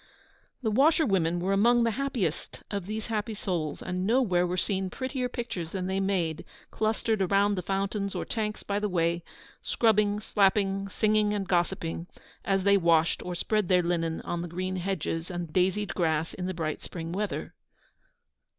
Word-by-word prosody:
The 220 - +1
washerwomen 210 - +3
were 190 +3 0
among 235 +4 +4
the 230 - +2
happiest 240 - -2
of 200 -3 -3
these 215 +1 -3
happy 220 -1 -2
souls, 175 -7 -3
and 185 +1 -2
nowhere 205 -8 +3
were 180 +1 -2
seen 190 +1 0
prettier 260 +3 -3
pictures 230 -9 -4
than 185 -2 -2
they 190 +1 -1
made, 185 -5 0 0.3
clustered 215 -3 0
round 200 +1 +3
the 180 - -2
fountains 195 +2 -2
or - - -2
tanks 215 -2 -3
by 200 0 -1
the 210 0 -1
way, 170 -1 +1 0.4
scrubbing, 210 -2 +2
slapping, 195 -1 +2
singing, 210 +1 +2
and 195 -2 -2
gossiping, 175 -2 -1 0.4
as 195 -1 +1
they 200 +1 +5
washed 165 -2 +3
or 180 - -4
spread 210 +2 0
their 180 -1 +4
linen 165 -1 -1
on 175 - -3
the 175 - -4
green 185 +2 -3
hedges 180 -3 -2
and 175 -3 -5
daisied 190 +3 +1
grass 160 -2 0
in 180 -1 -4
the 185 - -3
bright 155 -2 -3
spring 165 -1 -6
weather. 205 +3 -3
195 Hz, 170 wpm, -28 LUFS, 175-210 Hz, 0.4 s, they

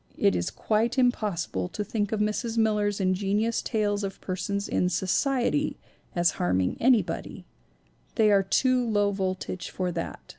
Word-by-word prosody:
It 100 - +3
is 85 0 -1
quite 225 +4 0
impossible 200 - 0
to 210 - -4
think 205 0 -2
of 220 - -1
Mrs. 220 +2 -1
Miller's 210 -2 +1
ingenious 200 +4 +1
tales 210 -2 -1
of 195 -1 -5
persons 200 +2 -3
in 180 - +1
"society" 250 - 0 0.4
as 175 -1 +3
harming 90 +1 +1
anybody; 245 -2 +1 0.7
they 215 -2 +4
are 200 -1 +5
too 255 +6 +2
low 205 -3 +1
voltage 185 -2 -3
for 180 -1 -2
that. 165 -1 -4
205 Hz, 145 wpm, -27 LUFS, 185-225 Hz, 0.7 s, are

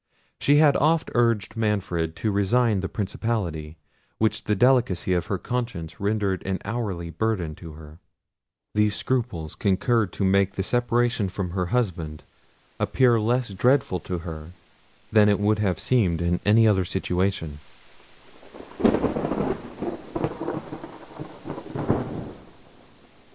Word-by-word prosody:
She 145 - +4
had 145 -1 +6
oft 160 +2 +2
urged 115 -3 +1
Manfred 95 -7 -1
to 110 - -1
resign 105 +2 +2
the 95 - -3
principality, 95 -7 -3 0.4
which 110 0 0
the 105 - +1
delicacy 120 -6 +3
of 90 -2 0
her 95 - -1
conscience 115 -8 -4
rendered 100 -2 0
an 95 -1 -1
hourly 100 -6 -3
burthen 95 -6 -1
to 80 -3 -10
her. 75 +1 -13 0.7
These 105 -1 +2
scruples 115 - -2
concurred 100 +1 +1
to 100 - -1
make 100 0 +3
the 95 - -1
separation 120 -2 +1
from 90 -1 -4
her 90 0 -1
husband 90 -10 -2 0.6
appear 125 -3 +3
less 120 +2 +1
dreadful 120 -1 +2
to 90 - -4
her 80 0 -7 0.6
than 105 -1 +6
it 100 - +2
would 105 +1 +2
have 95 -5 0
seemed 95 -10 +2
in 85 0 0
any 110 +2 +6
other 95 -3 +3
situation. 90 -4 -1
100 Hz, 115 wpm, -25 LUFS, 90-115 Hz, 0.7 s, had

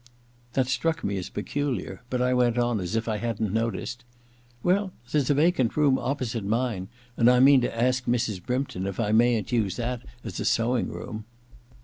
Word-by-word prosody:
That 130 0 +2
struck 160 +5 -1
me 100 0 -1
as 90 - -6
peculiar, 120 -4 -3
but 125 -1 0
I 125 0 +2
went 125 -1 +2
on 120 -2 +1
as 90 +3 -3
if 115 0 -1
I 110 -2 0
hadn't 110 -2 -2
noticed: 115 +2 -2 0.6
•Well, 190 +2 +2 0.2
there's 145 -4 +1
a 145 - +4
vacant 150 -5 +2
room 145 -3 +4
opposite 125 -5 -2
mine, 110 -2 -1 0.3
and 115 +1 +5
I 125 0 +5
mean 135 0 +7
to 115 -1 -2
ask 125 +1 +1
Mrs. 115 -6 0
Brympton 125 -7 -2
if 100 - -5
I 105 -2 +1
mayn't 115 -1 +3
use 110 -6 +1
that 120 0 -3 0.2
as - - -6
a - - -2
sewing 120 +2 +1
room.' 110 0 -7
120 Hz, 190 wpm, -26 LUFS, 110-130 Hz, 0.6 s, mean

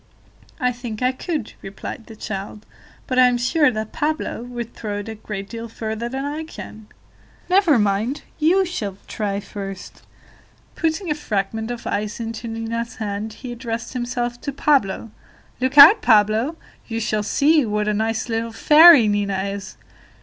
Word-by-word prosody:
"I 250 -3 +2
think 240 -2 -6
I 255 - +3
could," 290 - -4
replied 195 +3 -8
the 225 - -11
child, 210 0 -6 0.4
"but 255 -2 0
I 255 - +8
am 245 -1 +1
sure 295 +5 +3
that 215 -2 -4
Pablo 305 -5 -2
would 240 -1 -6
throw 210 -2 -5
it 205 +2 -6
a - - -4
great 210 -2 -7
deal 230 +1 -7
further 220 +1 -4
than 265 +2 -4
I 300 +2 -3
can." 220 -8 -10 0.6
"Never 365 -7 +5
mind, 210 +6 0 0.2
you 360 +5 +3
shall 210 - -4
try 200 -2 -2
first." 195 -2 -8 0.7
Putting 325 +1 -1
a - - +4
fragment 220 -5 -3
of 240 -1 -6
ice 210 +2 -2
into 230 0 -5
Nina's 225 +1 -4
hand, 210 0 -4
he 250 +2 -8
addressed 235 -1 -5
himself 240 -1 -3
to 280 - -3
Pablo: 255 -7 +1 0.5
"Look 260 +2 -1
out, 410 +10 +10
Pablo; 220 +6 +3 0.3
you 230 -1 -3
shall 215 -1 0
see 290 +8 +3
what 210 -2 -1
a 210 - +1
nice 220 +2 -1
little 230 0 -2
fairy 300 +1 +8
Nina 205 -1 0
is! 200 -1 -7
230 Hz, 165 wpm, -21 LUFS, 210-260 Hz, 0.7 s, out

